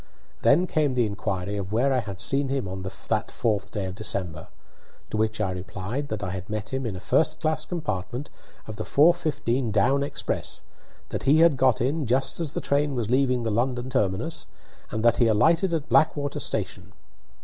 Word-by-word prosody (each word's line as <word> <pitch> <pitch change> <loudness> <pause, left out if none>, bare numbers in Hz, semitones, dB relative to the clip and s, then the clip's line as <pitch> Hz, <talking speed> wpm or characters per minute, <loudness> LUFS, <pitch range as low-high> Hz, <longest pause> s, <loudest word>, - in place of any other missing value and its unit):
Then 165 +6 +5
came 150 -6 +1
the 120 -2 +3
inquiry 100 -1 -3
of 100 -1 -4
where 130 +5 +2
I 130 - +2
had 100 -5 -6
seen 135 +6 +1
him 135 -6 -1
on 95 +1 -5
that 100 +4 -3
fourth 105 -4 -1
day 105 -2 -3
of 95 - -4
December; 95 -6 -3 0.6
to - - -1
which 110 0 0
I 100 -3 0
replied 95 +9 -4
that 110 -4 -4
I 95 -1 -3
met 105 +2 -4
him 130 -2 -1
in 105 - -4
a - - -6
first 155 - +1
class 155 -1 0
compartment 130 - -4 0.3
of 110 -1 -8
the - - -3
4:15 145 -6 +2
down 110 +7 +3
express, 140 - -3 0.5
that - - -4
he 155 +4 +7
got 130 -5 +2
in 140 +3 0
just 130 +6 +1
as 160 -3 -3
the - - -2
train 145 0 +1
was 115 -2 -2
leaving 130 -2 +2
the 115 - -1
London 125 +3 -1
terminus, 100 -7 -1 0.4
and 110 +1 -2
that 120 0 +5
he 120 - +4
alighted 165 - +3
at 160 -2 -1
Blackwater 145 -3 +2
station. - - -3
120 Hz, 185 wpm, -26 LUFS, 105-140 Hz, 0.6 s, he